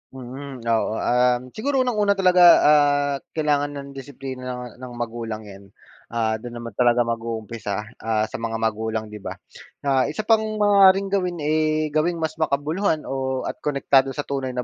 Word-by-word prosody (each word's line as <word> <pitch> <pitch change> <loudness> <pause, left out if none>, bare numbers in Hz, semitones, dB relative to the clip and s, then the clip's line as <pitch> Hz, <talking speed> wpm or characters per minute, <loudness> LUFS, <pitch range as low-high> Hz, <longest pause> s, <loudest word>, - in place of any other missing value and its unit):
Mm, 130 0 -8
oo. 115 -1 0
Um, 125 +1 +2
siguro 265 - 0
unang-una 210 -5 +1
talaga, 180 -2 +4 0.2
ah, 145 -1 +4 0.2
kailangan 145 -2 0
ng 140 0 -7
disiplina 135 -1 -8
ng 125 0 -9
ng 125 -1 -8
magulang 115 -2 -5
'yan. 100 -1 -13 0.4
Ah, 110 -1 -1
do'n 120 +1 -8
naman 120 0 -7
talaga 120 0 +4
mag-uumpisa, 115 -3 -4 0.2
ah, 110 -1 0
sa 110 - -4
mga 115 0 -3
magulang, 110 -1 -2
'di 105 - -8
ba? - - -6 0.5
Ah, 135 -2 +2
isa 155 +9 -4
pang 220 +1 +4 0.2
maaaring 195 -2 +5
gawin, 180 -5 -1
eh, 155 0 +1
gawing 155 +3 +1
mas 160 -1 -4
makabuluhan 155 +3 0
o 130 -1 -3
at - - -5
konektado 135 -2 +2
sa 145 - -2
tunay 135 -3 -4
na 125 - -1
135 Hz, 165 wpm, -23 LUFS, 115-155 Hz, 0.5 s, maaaring